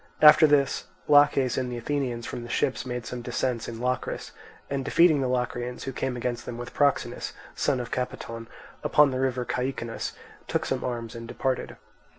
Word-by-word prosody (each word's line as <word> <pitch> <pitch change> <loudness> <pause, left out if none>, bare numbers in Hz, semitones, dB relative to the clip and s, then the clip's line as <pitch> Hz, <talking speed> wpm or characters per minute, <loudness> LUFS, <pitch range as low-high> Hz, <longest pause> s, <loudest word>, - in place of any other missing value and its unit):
After 155 +1 +9
this, 140 -2 +2 0.2
Laches 145 -4 +5
and 125 -1 -2
the 120 - -3
Athenians 120 -2 -2
from - - -5
the 120 - -8
ships 130 0 0
made 125 -2 -4
some 125 +2 -5
descents 120 -1 -2
in 115 -1 -6
Locris, 125 +1 -2 0.4
and 135 -1 -2
defeating 155 +1 +5
the 130 - +1
Locrians, 125 0 -2
who 135 - -4
came 130 0 -2
against 120 0 -3
them 120 - -5
with 120 +1 -7
Proxenus, 145 -1 +1 0.2
son 140 -3 +1
of 120 - -5
Capaton, 115 -2 -4 0.4
upon 150 -2 +5
the 130 - -2
river 130 -2 0
Caicinus, 125 -3 -3 0.3
took - - 0
some - - -1
arms 120 -2 -3
and 115 -1 -7
departed. 130 +1 -2
125 Hz, 175 wpm, -27 LUFS, 120-135 Hz, 0.4 s, After